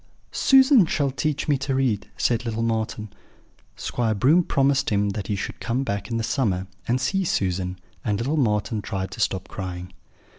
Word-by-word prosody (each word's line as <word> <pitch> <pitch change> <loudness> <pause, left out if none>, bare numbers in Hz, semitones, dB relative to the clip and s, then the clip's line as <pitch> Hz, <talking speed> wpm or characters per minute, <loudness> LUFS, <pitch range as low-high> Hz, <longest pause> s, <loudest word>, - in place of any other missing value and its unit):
"'Susan 265 -3 +6
shall 145 -4 0
teach 145 +2 -2
me 145 -3 +2
to 135 0 -1
read,' 125 -7 0
said 120 -1 +1
little 115 -1 -2
Marten. 110 -2 -2 0.6
"Squire 115 -3 -1
Broom 150 - +4
promised 140 -2 +2
him 100 -1 +1
that 100 -1 -4
he 105 - -1
should 100 - -5
come 125 +4 -1
back 100 -4 -3
in 115 - -1
the 115 - -1
summer, 100 -8 0 0.2
and 125 +2 +1
see 190 +10 0
Susan, 90 - -1 0.3
and 105 -2 0
little 135 +8 -1
Marten 105 -5 0
tried 95 -1 -4
to - - -9
stop 95 -4 0
crying. 90 -1 -6
115 Hz, 180 wpm, -24 LUFS, 100-135 Hz, 0.6 s, Susan